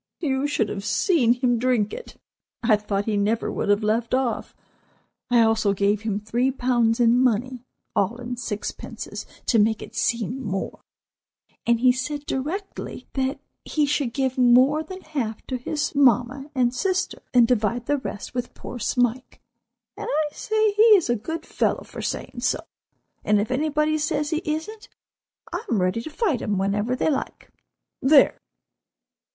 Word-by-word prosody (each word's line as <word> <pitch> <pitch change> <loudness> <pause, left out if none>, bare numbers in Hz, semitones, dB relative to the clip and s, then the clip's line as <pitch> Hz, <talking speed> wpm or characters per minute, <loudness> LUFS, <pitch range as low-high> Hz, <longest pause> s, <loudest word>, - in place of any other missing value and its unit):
You 275 -3 0
should 255 -7 0
have 195 - -5
seen 240 - +3
him 245 -1 +1
drink 240 -4 +1
it. - - -9 0.5
I 225 -2 +5
thought 205 -1 -2
he 215 -2 0
never 210 +3 0
would - - -2
have 205 +1 +3
left 225 +3 +1
off. 260 -2 -2 0.7
I 240 -1 +5
also 220 -2 +3
gave 200 +1 +1
him 215 -2 -2
three 235 +5 0
pounds 245 -3 +1
in 240 0 +4
money, 250 0 0 0.3
all 205 +3 +1
in 245 0 -5
sixpences 230 -3 -6 0.2
to 230 - +3
make 220 +1 +3
it - - -11
seem 235 +3 -1
more, 195 -3 -4 0.9
and 235 -1 +3
he 255 0 +6
said 285 +4 -3
directly 330 +11 -4
that 265 0 -1 0.2
he 305 -2 +1
should 285 -3 0
give 260 0 -1
more 255 +5 +5
than 375 +4 -8
half 255 -10 -4
to 260 - -3
his 290 +4 -2
mamma 270 +1 +2
and 245 -2 +2
sister, 375 +7 -1
and 245 -3 +5
divide 235 0 0
the 290 +2 +1
rest 210 -6 -6
with 245 -1 -4
poor 245 - -8
Smike. 245 +2 -1 0.6
And - - -6
I 300 0 0
say 435 -1 +1
he 425 +2 +4
is 315 -10 0
a - - +2
good 320 +9 -5
fellow - - 0
for - - -9
saying - - -4
so; - - 0 0.6
and 210 0 +3
if 210 +4 -2
anybody 305 +3 +1
says 300 0 -1
he 315 0 0
isn't, 320 +8 -4 0.6
I - - -3
am 225 - +2
ready 185 +5 0
to 275 - -7
fight 315 - 0
him 205 -2 -1
whenever 205 +5 0
they 310 - +1
like—there! 275 0 0
250 Hz, 165 wpm, -24 LUFS, 225-290 Hz, 0.9 s, he